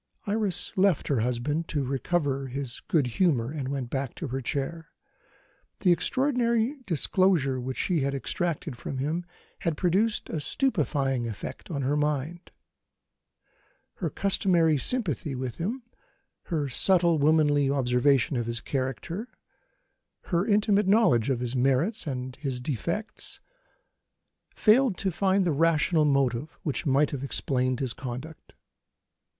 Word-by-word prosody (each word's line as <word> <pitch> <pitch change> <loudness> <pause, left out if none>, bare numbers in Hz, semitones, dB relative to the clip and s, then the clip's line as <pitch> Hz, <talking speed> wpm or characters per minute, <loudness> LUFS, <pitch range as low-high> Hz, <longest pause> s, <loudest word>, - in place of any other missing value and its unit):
Iris 205 -2 -1
left 190 -4 +2
her 140 -5 +2
husband 125 +8 -1
to 145 -3 -1
recover 135 +1 -1
his 130 -1 -5
good 155 -5 +2
humour, 125 -2 +1
and 145 -4 -4
went 135 -3 -4
back 135 -2 -3
to 160 - -5
her 135 +2 -3
chair. 145 +5 -3 0.9
The 185 - +4
extraordinary 245 - +1
disclosure 165 -6 +2
which 130 +1 -4
she 175 -4 +1
had 140 0 -1
extracted 160 +1 -2
from 130 +3 -6
him 160 +6 -2 0.3
had 165 -3 -1
produced 195 +5 +1
a 160 - -3
stupefying 140 - 0
effect 110 - -7
on 140 -5 -2
her 140 +3 +1
mind. 150 +3 -2 1.5
Her - - -2
customary 175 -6 +2
sympathy 155 - -1
with 125 -2 -4
him, 230 +9 -3 0.6
her 155 -5 -1
subtle 170 +4 +3
womanly 145 -2 +3
observation 135 0 +2
of 120 -1 -2
his 115 0 -3
character, 140 - -3 1.0
her 175 +3 0
intimate 205 -1 +3
knowledge 190 - +4
of 125 -3 0
his 125 +1 -2
merits 135 - +1
and 130 -2 -4
his 135 -4 -3
defects, 170 - -3 1.2
failed 235 -1 +4
to 190 - -1
find 190 +2 +2
the 170 - +2
rational 160 +1 +3
motive 135 0 0
which 150 +1 -2
might 140 +2 +3
have 140 -2 -4
explained 130 -2 0
his 130 -4 -1
conduct. 130 +5 -8
150 Hz, 135 wpm, -27 LUFS, 130-180 Hz, 1.5 s, The